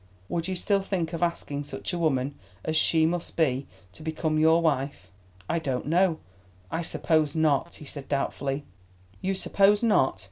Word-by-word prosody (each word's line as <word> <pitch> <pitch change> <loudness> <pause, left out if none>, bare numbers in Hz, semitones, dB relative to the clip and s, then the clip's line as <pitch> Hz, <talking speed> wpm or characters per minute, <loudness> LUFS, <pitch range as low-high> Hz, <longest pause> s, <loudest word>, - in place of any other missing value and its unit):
Would 170 0 -1
you 190 - -2
still 200 +2 +1
think 180 -4 -2
of 165 - -3
asking 160 -4 -1
such 180 - -5
a 175 - -1
woman 140 -4 +1 0.3
as 160 - -1
she 160 0 +4
must 170 +1 -2
be 140 -4 +1 0.3
to - - -13
become 155 0 -1
your 160 +1 +5
wife?" 140 - -1 0.4
"I 170 - +1
don't 135 -5 -2
know; 170 +2 +3 0.5
I 165 - -1
suppose 155 -3 +1
not," 155 -4 +2
he 150 - -11
said 140 -1 -8
doubtfully. 140 0 -1 0.6
"You 190 +1 0
suppose 200 +3 +3
not. 210 - +3
160 Hz, 170 wpm, -27 LUFS, 145-170 Hz, 0.6 s, your